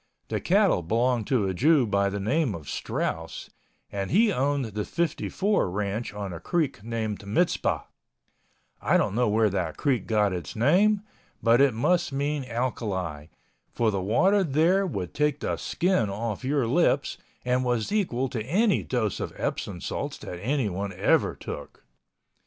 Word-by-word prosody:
The - - -1
cattle - - +3
belonged 115 +5 +1
to 115 -7 +2
a 95 - -1
Jew 140 - +4
by 100 -2 +1
the 100 +1 -3
name 125 - 0
of 80 -4 -9
Strauss 80 0 -4 0.4
and 100 -1 -3
he 210 +3 +4
owned 140 0 0
the 105 -1 -3
"54" 175 - 0
Ranch 100 +3 -2
on 100 -2 -5
a 85 - -6
creek 150 - -1
named 110 -3 -3
Mizpah—I 170 - -2
don't - - 0
know 120 0 +2
where 110 0 +3
that 95 -2 -2
creek 135 -5 0
got 105 -3 +2
its 85 -4 -5
name, 195 - +3 0.4
but 115 +2 +5
it 135 -5 +4
must 170 +8 +1
mean 140 +1 -1
alkali, 100 -11 -3 0.4
for 115 -2 +1
the 100 -2 -1
water 185 - +3
there 170 +6 +2
would 95 - -4
take 150 -1 +1
the - - -1
skin 175 - 0
off 105 +3 -4
your 135 -1 +1
lips 115 - +1 0.3
and 125 +1 +1
was 120 - 0
equal 150 - 0
to 115 -4 -3
any 195 - +2
dose 110 -6 -1
of - - -4
Epsom - - -3
salts - - -4
that 90 - -7
anyone 100 -5 -1
ever 95 - +2
took. - - -8
120 Hz, 160 wpm, -26 LUFS, 100-150 Hz, 0.4 s, but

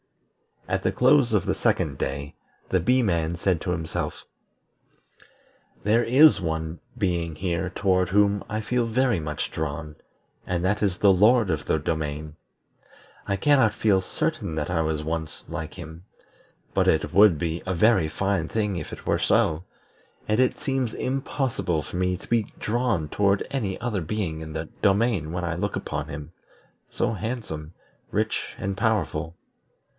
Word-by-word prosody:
At - - 0
the - - +2
close - - +4
of - - +2
the - - +1
second - - 0
day, 70 +1 -3 0.4
the 95 - +2
Bee 125 +8 +3
man 85 -5 0
said 90 -1 0
to 90 - -2
himself: 80 -2 -3 1.6
"There 110 +3 +3
is 140 +1 +6
one 80 -1 -3 0.2
being 85 -6 -1
here 90 +1 -2
toward 95 -1 +1
whom 100 +1 +3
I 110 +1 -2
feel 120 +2 0
very 120 -3 +2
much 75 -1 -4
drawn, 75 0 -4 0.5
and 90 -1 -1
that 105 +3 +1
is 95 -4 +1
the 100 - +5
Lord 105 +2 +4
of 75 -3 -2
the - - +2
Domain. 75 -1 -3 0.9
I 100 - +1
cannot 130 0 +4
feel 100 -3 +3
certain 80 -3 -2
that 75 +2 -2
I 80 -2 +1
was 80 -1 -1
once 80 -1 -4
like 80 -2 -6
him, 85 0 -10 0.7
but - - +2
it 80 - +2
would 100 -5 +6
be 85 +1 -2
a 95 - 0
very 105 -2 +4
fine 95 0 -1
thing 105 -2 -1
if - - -6
it - - -9
were - - +1
so; 80 +3 +2 0.6
and 105 +2 +1
it 130 -1 +3
seems 135 -4 -1
impossible 130 - -1
for 90 - -6
me 90 0 +1
to - - -15
be 115 -2 +2 0.2
drawn 110 -8 0
toward 100 +2 +2
any 105 -9 -2
other 115 -6 -1
being 80 -2 -3
in 80 -1 -7
the 80 0 -4
domain 100 -5 +2
when 90 +1 -3
I 85 0 -1
look 100 +4 -2
upon 75 - -3
him, 75 0 -7 0.6
so 120 -1 -1
handsome, 105 -8 -5 0.4
rich, - - -2
and 100 0 -3
powerful. 85 -7 0
90 Hz, 160 wpm, -25 LUFS, 80-110 Hz, 1.6 s, is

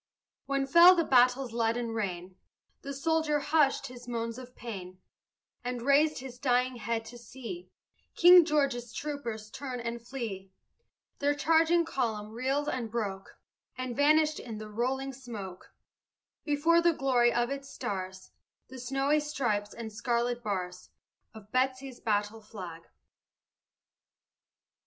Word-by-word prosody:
When 275 0 0
fell 340 +6 +8
the 335 - +2
battle's 250 -2 +3
leaden 230 0 0
rain, 185 -4 -4 0.5
The 280 - -6
soldier 315 +1 +1
hushed 290 -1 +2
his 245 -1 -10
moans 230 0 -3
of 250 -1 -12
pain 185 -6 -8 0.6
And 245 -1 -4
raised 295 +3 +4
his 250 -1 -8
dying 250 -1 +1
head 230 0 -2
to 240 +2 -10
see 260 +9 -9 0.5
King 355 0 +9
George's 275 -7 0
troopers 235 -8 -5
turn 260 -3 -5
and 235 0 -4
flee. 230 -6 -6 0.7
Their 290 +1 +2
charging 325 +3 +3
column 220 -8 -2
reeled 265 +5 -1
and 250 -6 -2
broke, 200 -4 -4 0.4
And 255 -2 -4
vanished 305 +2 +3
in 225 -3 -7
the 215 0 -8
rolling 265 +5 -2
smoke, 220 -8 -9 0.7
Before 320 +3 +3
the 340 0 +4
glory 255 -5 +3
of 240 +1 0
the 275 0 -3
stars, 190 -8 -6 0.4
The 260 0 -9
snowy 270 +4 +1
stripes, 240 -9 -1
and 225 -2 -7
scarlet 240 +2 -1
bars 180 -5 -4 0.5
Of 215 -1 -13
Betsy's 260 0 -1
battle 210 0 -1
flag. 180 -6 -9
245 Hz, 130 wpm, -30 LUFS, 225-280 Hz, 0.7 s, King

